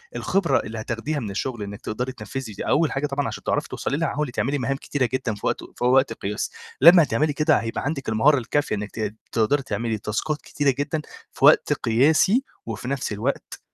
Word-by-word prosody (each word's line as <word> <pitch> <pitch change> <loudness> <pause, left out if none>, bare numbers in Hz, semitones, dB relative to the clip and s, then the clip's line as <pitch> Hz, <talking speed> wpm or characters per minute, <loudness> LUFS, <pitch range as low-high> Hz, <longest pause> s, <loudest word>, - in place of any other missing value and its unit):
الخبرة 170 -9 +1
اللي 110 0 -6
هتاخديها 120 +7 -3
من 110 -5 -4
الشغل 115 +1 -3
إنِك 100 +1 -7
تقدري 125 +4 -3
تنفّذي، 115 0 -6
دي - - -6
أول 155 +1 +3
حاجة 140 +2 -1
طبعًا 140 0 -1
عشان - - -6
تعرفي - - 0
توصلي 140 - -2
لها، 165 -1 0
حاولِ 150 -2 -2
تعملي 140 +4 0
مهام 135 +2 -1
كتيرة 130 -4 -1
جدًا 125 -5 -1
في 105 - -9
وقت - - -1
في - - -4
وقت 130 +2 +4
قياسي، 105 +1 -4 0.3
لمّا 170 +2 +9
هتعملي 145 +4 +1
كده 155 +1 +3
هيبقى 115 +2 -3
عندِك 135 -4 -3
المهارة 135 +7 +4
الكافية 145 +1 0
إنك 105 0 -5
ت 110 -1 -4 0.2
تقدري 130 +5 +2
تعملي 110 0 -2
تاسكات 110 +9 -2
كتيرة 140 -3 0
جدًا 155 +2 -1 0.3
في - - +1
وقت - - +6
قياسي، 155 - +3 0.2
وفي 115 +2 -5
نفس 135 -5 -2
الوقت 120 +7 -3
130 Hz, 200 wpm, -24 LUFS, 110-145 Hz, 0.3 s, لمّا